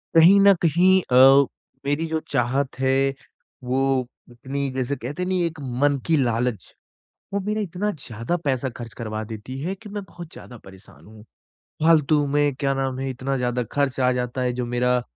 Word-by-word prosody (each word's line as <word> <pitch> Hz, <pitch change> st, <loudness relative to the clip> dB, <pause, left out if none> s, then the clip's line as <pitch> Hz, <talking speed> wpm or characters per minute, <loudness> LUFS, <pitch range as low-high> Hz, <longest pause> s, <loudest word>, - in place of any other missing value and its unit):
कहीं 180 Hz, +5 st, +7 dB
न 200 Hz, 0 st, +7 dB
कहीं 185 Hz, +4 st, +4 dB
अ, -, -, +3 dB, 0.7 s
मेरी 145 Hz, +3 st, 0 dB
जो 160 Hz, 0 st, -1 dB
चाहत 130 Hz, +1 st, -1 dB
है 130 Hz, 0 st, +2 dB, 0.7 s
वो 130 Hz, 0 st, 0 dB, 0.2 s
इतनी 135 Hz, +3 st, -4 dB
जैसे 130 Hz, +2 st, -1 dB
कहते 145 Hz, +9 st, -5 dB
नहीं 185 Hz, -1 st, 0 dB
एक 160 Hz, -2 st, -4 dB, 0.2 s
मन 145 Hz, -1 st, +3 dB
की 165 Hz, -, +3 dB
लालच। 120 Hz, -4 st, -2 dB, 0.6 s
वो 200 Hz, -, +1 dB
मेरा 215 Hz, +1 st, -1 dB
इतना 200 Hz, +2 st, -2 dB
ज़्यादा 125 Hz, -, -4 dB
पैसा 130 Hz, -1 st, 0 dB
खर्च 115 Hz, -1 st, -8 dB
करवा 110 Hz, -1 st, -5 dB
देती 110 Hz, +4 st, -7 dB
है 185 Hz, +5 st, -3 dB
कि 210 Hz, +2 st, -13 dB
मैं 205 Hz, -1 st, -5 dB
बहुत 170 Hz, -1 st, -11 dB
ज़्यादा 120 Hz, -, -11 dB
परेशान 95 Hz, 0 st, -16 dB
हूँ। 105 Hz, 0 st, -15 dB, 0.6 s
फालतू 155 Hz, -2 st, +4 dB
में, 145 Hz, 0 st, +1 dB
क्या 135 Hz, 0 st, 0 dB
नाम 135 Hz, -1 st, -2 dB
है 135 Hz, 0 st, -3 dB
इतना 130 Hz, +1 st, -3 dB
ज़्यादा 125 Hz, 0 st, -1 dB
खर्च 140 Hz, -2 st, 0 dB
आ 125 Hz, -1 st, +3 dB
जाता 125 Hz, +1 st, -3 dB
है 125 Hz, -1 st, 0 dB
जो 125 Hz, -, -1 dB
मेरा 125 Hz, +1 st, +2 dB
अ, 125 Hz, -, -1 dB
135 Hz, 180 wpm, -23 LUFS, 125-160 Hz, 0.7 s, कहीं